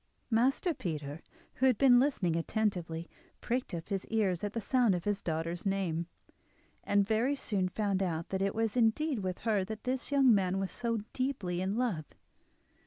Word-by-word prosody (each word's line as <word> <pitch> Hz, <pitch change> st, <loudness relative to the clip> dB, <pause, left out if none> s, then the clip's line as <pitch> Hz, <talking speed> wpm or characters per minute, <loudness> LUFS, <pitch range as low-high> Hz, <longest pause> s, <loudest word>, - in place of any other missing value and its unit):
Master 265 Hz, +9 st, +2 dB
Peter, 155 Hz, -, -5 dB, 0.4 s
who 265 Hz, -, +4 dB
had 250 Hz, -4 st, +3 dB
been 250 Hz, -1 st, +6 dB
listening 225 Hz, -, +1 dB
attentively, 170 Hz, -3 st, -1 dB, 0.3 s
pricked 250 Hz, +2 st, -2 dB
up 165 Hz, +2 st, -7 dB
his 195 Hz, -2 st, -2 dB
ears 200 Hz, -6 st, 0 dB
at 205 Hz, 0 st, -2 dB
the 230 Hz, -, -1 dB
sound 235 Hz, -3 st, +3 dB
of 175 Hz, -, -3 dB
his 205 Hz, -1 st, -1 dB
daughter's 165 Hz, +1 st, -3 dB
name, 185 Hz, -4 st, -1 dB, 0.8 s
and 200 Hz, -1 st, +2 dB
very 230 Hz, +6 st, +2 dB
soon 195 Hz, -8 st, -1 dB
found 200 Hz, -1 st, 0 dB
out 165 Hz, -3 st, -2 dB
that 190 Hz, 0 st, -2 dB
it 195 Hz, 0 st, 0 dB
was 225 Hz, 0 st, 0 dB
indeed 250 Hz, +4 st, +2 dB
with 185 Hz, -2 st, -3 dB
her 215 Hz, -4 st, +1 dB
that 215 Hz, +3 st, -7 dB
this 255 Hz, +2 st, -2 dB
young 270 Hz, -4 st, +6 dB
man 190 Hz, -2 st, +2 dB
was 195 Hz, -1 st, -2 dB
so 230 Hz, -2 st, -2 dB
deeply 205 Hz, -10 st, -2 dB
in 190 Hz, +2 st, -1 dB
love. 220 Hz, -11 st, -1 dB
205 Hz, 175 wpm, -32 LUFS, 180-240 Hz, 0.8 s, been